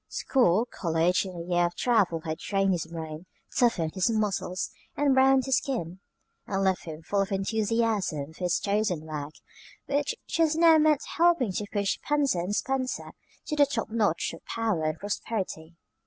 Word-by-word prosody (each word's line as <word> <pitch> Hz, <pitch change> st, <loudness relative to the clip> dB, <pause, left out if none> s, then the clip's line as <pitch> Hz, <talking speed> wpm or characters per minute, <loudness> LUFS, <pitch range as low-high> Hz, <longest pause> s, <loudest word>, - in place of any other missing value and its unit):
School, 230 Hz, -5 st, +2 dB
college, 170 Hz, +2 st, +1 dB
and 185 Hz, -2 st, -7 dB
a 170 Hz, -, -6 dB
year 175 Hz, -1 st, +2 dB
of 175 Hz, -, -9 dB
travel 200 Hz, -9 st, +2 dB
had 160 Hz, 0 st, -4 dB
trained 195 Hz, -1 st, +1 dB
his 170 Hz, -3 st, -1 dB
brain, 160 Hz, 0 st, -7 dB, 0.3 s
toughened 175 Hz, -10 st, +2 dB
his 185 Hz, +4 st, +1 dB
muscles, 210 Hz, -4 st, -1 dB, 0.3 s
and 290 Hz, -2 st, +3 dB
browned 265 Hz, 0 st, +4 dB
his 265 Hz, -1 st, +3 dB
skin, 190 Hz, -, -3 dB, 0.5 s
and 195 Hz, 0 st, -1 dB
left 190 Hz, -1 st, +1 dB
him 160 Hz, -1 st, -8 dB
full 200 Hz, +4 st, 0 dB
of 195 Hz, +1 st, -2 dB
enthusiasm 200 Hz, -6 st, 0 dB
for 180 Hz, -, -9 dB
his 175 Hz, 0 st, +2 dB
chosen 200 Hz, -5 st, 0 dB
work, 150 Hz, -1 st, -5 dB, 0.5 s
which 285 Hz, +1 st, -1 dB
just 320 Hz, -1 st, +1 dB
now 325 Hz, -1 st, +6 dB
meant 305 Hz, -1 st, +3 dB
helping 335 Hz, -, +3 dB
to 205 Hz, +3 st, -3 dB
push 200 Hz, -2 st, 0 dB
Spencer 280 Hz, -12 st, +1 dB
& -, -, -4 dB
Spencer 255 Hz, +4 st, -2 dB, 0.3 s
to 300 Hz, -, -2 dB
the 290 Hz, -1 st, +5 dB
top 230 Hz, -5 st, -3 dB
notch 210 Hz, -9 st, 0 dB
of 165 Hz, -, -11 dB
power 220 Hz, -9 st, -1 dB
and 155 Hz, 0 st, -1 dB
prosperity. 190 Hz, -5 st, -4 dB
200 Hz, 170 wpm, -27 LUFS, 170-250 Hz, 0.5 s, now